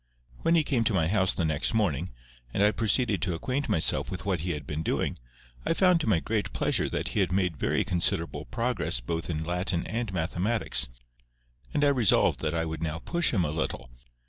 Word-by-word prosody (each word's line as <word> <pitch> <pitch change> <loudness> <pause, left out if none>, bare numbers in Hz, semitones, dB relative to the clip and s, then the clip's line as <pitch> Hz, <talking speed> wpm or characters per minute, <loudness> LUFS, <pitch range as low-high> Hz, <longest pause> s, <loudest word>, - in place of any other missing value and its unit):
When 165 - +2
he 160 - +4
came 130 -5 +1
to 110 - +2
my 80 -4 +2
house 95 0 +2
the 85 - -1
next 80 +7 +1
morning, 90 - 0 0.5
and 100 - +3
I 105 - +5
proceeded 110 -3 +1
to 85 +1 0
acquaint 130 +11 -2
myself 80 - +2
with 95 +1 -6
what 95 -3 0
he 85 +2 -2
had 75 - -6
been 75 +1 -4
doing, 80 - -1 0.4
I - - +1
found 180 -2 +4
to 115 - -1
my 95 -6 +3
great 105 +4 -2
pleasure - - +1
that - - -2
he - - -1
had - - +1
made 90 -3 +1
very - - 0
considerable 85 -3 0
progress 120 - -1
both 80 +8 -4
in 80 -1 -2
Latin 90 +1 -1
and 115 -2 -3
Mathematics, 90 - +1 0.8
and 145 - 0
I 145 - +5
resolved 125 -7 +3
that 80 +1 -2
I 80 0 0
would 80 -1 -5
now 80 -1 -2
push 170 -1 +1
him 95 -7 +1
a 75 - -2
little. 75 -5 -3
90 Hz, 210 wpm, -28 LUFS, 80-115 Hz, 0.8 s, I